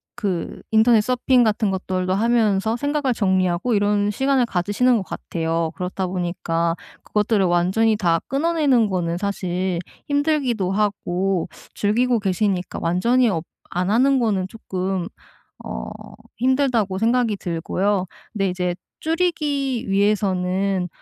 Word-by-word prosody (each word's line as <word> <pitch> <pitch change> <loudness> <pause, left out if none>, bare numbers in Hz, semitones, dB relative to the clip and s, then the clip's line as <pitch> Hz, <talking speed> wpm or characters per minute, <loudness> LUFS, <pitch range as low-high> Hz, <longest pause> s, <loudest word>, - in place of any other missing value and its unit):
그 195 -8 -3
인터넷 220 0 +5
서핑 250 +2 +2
같은 215 -2 +1
것들도 185 -1 -1
하면서 220 0 +2
생각을 285 -1 0
정리하고 185 +2 +1
이런 205 0 +2
시간을 265 +2 +2
가지시는 205 +6 +1
것 - - -1
같아요. 165 -2 -2
그렇다 185 +1 -3
보니까 175 -2 -1 0.3
그것들을 210 -1 +1
완전히 185 +6 +2
다 170 -4 +2
끊어내는 280 -6 +2
거는 170 -3 -1
사실 185 -2 -2 0.3
힘들기도 285 - +1
하고 195 -3 0 0.2
즐기고 235 +3 +1
계시니까 190 -2 -1
완전히 235 +9 +2
어 170 -6 -1 0.3
안 180 +1 0
하는 260 +5 +3
거는 200 -5 0
쪼끔 190 -3 -3 0.6
어 - - -6 0.5
힘들다고 250 -6 +1
생각이 230 0 +1
들고요. 185 +3 -1 0.3
근데 195 -3 0
이제 180 -1 -1 0.3
줄이기 300 -7 0
위해서는 195 -2 +1
200 Hz, 290 characters per minute, -22 LUFS, 185-240 Hz, 0.6 s, 인터넷